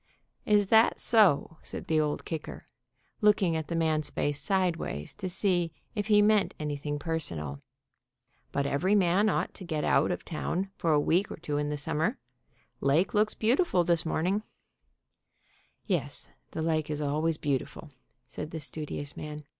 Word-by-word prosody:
"Is 205 -2 +3
that 225 +1 +5
so?" 185 - +4
said - - -4
the 160 -1 +2
Old 150 -1 -1
Kicker, 160 -2 -6 0.6
looking 205 -5 +4
at 160 -2 -3
the 170 - -3
man's 155 -2 +1
face 145 0 -1
sideways 170 - -1
to 185 - -5
see 175 -3 +1 0.2
if 205 -3 -2
he 210 -1 +5
meant 210 -2 +3
anything 145 -1 -3
per 160 +2 -2
sonal. 75 - -4 0.9
"But 140 - 0
every 175 +9 +2
man 195 +2 +3
ought - - -1
to 195 - -9
get 160 -4 -2
out - - +3
of - - -3
town 185 +4 -3
for 165 - 0
a 150 - +4
week 175 +6 +2
or - - -7
two 145 -1 -3
in 145 0 -1
the 150 - -2
summer. 160 - -1 0.6
Lake 155 +7 +2
looks 215 +1 +2
beau 225 +3 +3
tiful 280 - +2
this 170 -1 +2
morning/' 180 +5 0 1.4
"Yes, 60 - -2 0.2
the 160 - -4
lake 155 -2 0
is 150 -1 -2
always 155 +2 0
beautiful," 145 +1 -3 0.4
said 150 +3 -6
the 160 - -6
studi 150 0 -5
ous 145 -1 -7
man. 150 0 -7
160 Hz, 170 wpm, -29 LUFS, 150-190 Hz, 1.4 s, that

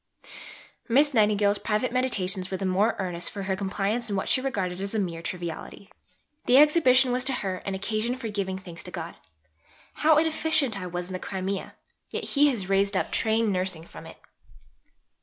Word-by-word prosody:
Miss 285 +5 +4
Nightingale's 210 -2 +3
private 215 +3 -1
meditations 195 -7 -1
were 190 - -2
the 195 - -3
more 195 +5 +2
earnest 180 -3 -2
for 200 -2 -6
her 190 0 -1
compliance 205 +4 -2
in 200 - -1
what 190 - -2
she 260 - +3
regarded 195 -9 -2
as 200 +2 -2
a - - +2
mere 170 -4 -3
triviality. 175 +3 -6 0.6
The 250 - +6
Exhibition 270 -4 +5
was 250 0 0
to 270 - +2
her 195 -6 -2
an 195 - -1
occasion 215 +5 -1
for 255 -3 -6
giving 195 -2 -2
thanks 175 -3 -10
to - - -7
God. 170 -2 -6 0.8
"How 310 0 +4
inefficient 315 -5 +1
I 180 - -4
was 175 0 -4
in 185 - -8
the 185 - -3
Crimea! 190 +1 -4 0.3
Yet - - -4
He 290 0 +4
has 215 -9 -2
raised 195 0 +2
up - - -1
Trained 220 -1 +1
Nursing 185 -3 -2
from - - -12
it!" - - -12
200 Hz, 185 wpm, -26 LUFS, 185-245 Hz, 0.8 s, The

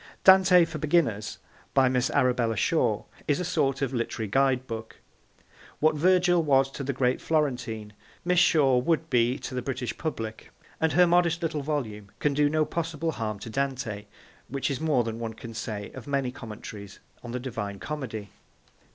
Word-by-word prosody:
Dante 190 -2 +7
for 160 -1 -6
Beginners, 145 -10 +1 0.4
by 135 -1 +5
Miss 125 -1 +1
Arabella 125 -3 +2
Shore, - - +1 0.2
is 145 - +2
a 180 - -2
sort 140 -6 0
of 135 - -1
literary 115 -2 -2
guide 130 +3 +2
book. 115 -2 -7 0.8
What 155 +1 +4
Virgil 175 +2 +4
was 135 -3 +3
to 140 - -6
the 140 - -1
great 130 -1 0
Florentine, 125 -9 -1 0.3
Miss 180 -1 +3
Shore 135 -8 +4
would 160 +2 0
be 120 +1 +3
to - - -7
the 125 - -2
British 125 -3 -3
public, 110 -8 -5 0.3
and 160 0 +1
her 180 0 +6
modest 175 0 +2
little 155 -2 -1
volume 115 -9 -3
can 150 - +1
do 145 +1 +3
no 155 0 +2
possible 165 0 -2
harm 110 -6 -3
to 115 - -7
Dante, 120 -6 -3 0.4
which 140 +1 -2
is 135 - -3
more 150 -6 +2
than 115 0 -4
one 115 -1 -4
can 115 0 -9
say 110 -3 -5
of 130 -1 -10
many 140 -3 0
commentaries 105 -4 -9 0.3
on 120 - -7
the 125 - -3
Divine 110 -6 -5
Comedy. 110 - -5
135 Hz, 175 wpm, -27 LUFS, 115-155 Hz, 0.8 s, Dante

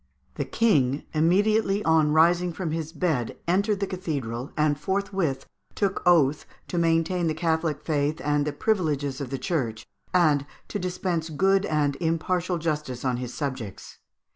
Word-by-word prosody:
The - - -3
King, 145 - +2
immediately 200 +5 +2
on 160 -2 +4
rising 170 +3 +4
from 165 -1 -3
his 160 -1 -3
bed, 155 -8 -1
entered 200 +3 +1
the - - +2
cathedral, 140 -10 -4
and 150 -1 +2
forthwith 190 -4 -1 0.3
took 195 -2 0
oath 155 -5 +4 0.2
to 175 - -1
maintain 165 +1 +1
the 155 - 0
Catholio 160 -2 0
faith 150 -1 -1
and 145 0 +1
the - - 0
privileges 145 -6 -1
of 135 - -4
the 135 - -3
Church, 130 - -2 0.3
and 150 -6 +3 0.2
to 205 - -3
dispense 180 -2 -2
good 195 +5 +2
and 145 -3 +1
impartial 175 +2 0
justice 150 -6 -2
to 130 -2 0
his 125 0 -4
subjects. 130 -9 -5
160 Hz, 150 wpm, -26 LUFS, 145-180 Hz, 0.3 s, on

